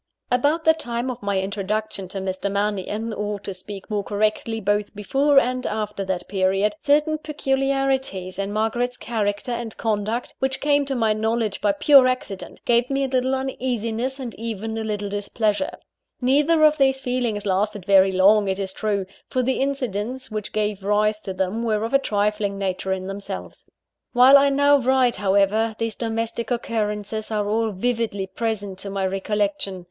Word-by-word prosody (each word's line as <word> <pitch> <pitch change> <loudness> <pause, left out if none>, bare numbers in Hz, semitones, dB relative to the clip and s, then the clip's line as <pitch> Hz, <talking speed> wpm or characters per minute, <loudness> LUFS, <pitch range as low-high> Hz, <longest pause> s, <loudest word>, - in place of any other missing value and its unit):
About 290 +6 +2
the 320 - +7
time 245 -4 -3
of 250 - -8
my 200 -1 0
introduction 200 0 -2
to 190 - -6
Mr. 190 +1 -2
Mannion 210 +2 -2
or, 210 -1 -3
to 200 - -5
speak 195 +1 -9
more 205 -2 -1
correctly, 215 +2 -1
both 205 0 -1
before 275 +8 +2
and 255 -1 +3
after 210 -2 -3
that 185 -2 -3
period 195 +1 +1
certain 300 +2 +2
peculiarities 270 - -1
in 200 0 -2
Margaret's 240 +4 -1
character 210 0 -2
and 235 -2 -4
conduct, 220 +2 -2
which 265 0 -1
came 285 -1 +2
to 270 - -1
my 225 -3 +2
knowledge 220 -1 -1
by 205 - +3
pure 270 +4 +6
accident, 255 -6 -4
gave 240 +1 +3
me 275 0 0
a - - +1
little 260 0 +1
uneasiness 255 -1 -2
and 245 -4 -5
even 225 -1 -4
a - - -3
little 210 -2 -3
displeasure. 205 +6 -1 0.5
Neither 295 +5 +3
of 305 -1 +4
these 270 -1 +3
feelings 245 -5 -1
lasted 200 0 0
very 195 -1 +5
long, 200 +2 +5
it 190 0 0
is 190 -1 -4
true; 205 -2 -1 0.2
for 255 - 0
the 260 +2 0
incidents 255 -2 -2
which 215 -1 -4
gave 210 -2 -1
rise 210 +1 +2
to 195 - -5
them 190 +4 -2
were 220 -2 0
of 230 - -3
a 275 - +6
trifling 210 -3 0
nature 190 -1 -2
in 190 0 -2
themselves. 195 +1 -7 0.5
While 255 +2 +8
I 280 0 +4
now 285 +1 +4
write, 255 -1 +2
however, 205 +3 +2
these 225 -1 -2
domestic 230 0 -3
occurrences 215 -3 -2
are 210 -2 -1
all 220 +2 +1
vividly 220 -1 -1
present 205 -1 -3
to 200 - -5
my 195 -1 -1
recollection. 195 0 -1
215 Hz, 170 wpm, -23 LUFS, 200-255 Hz, 0.5 s, While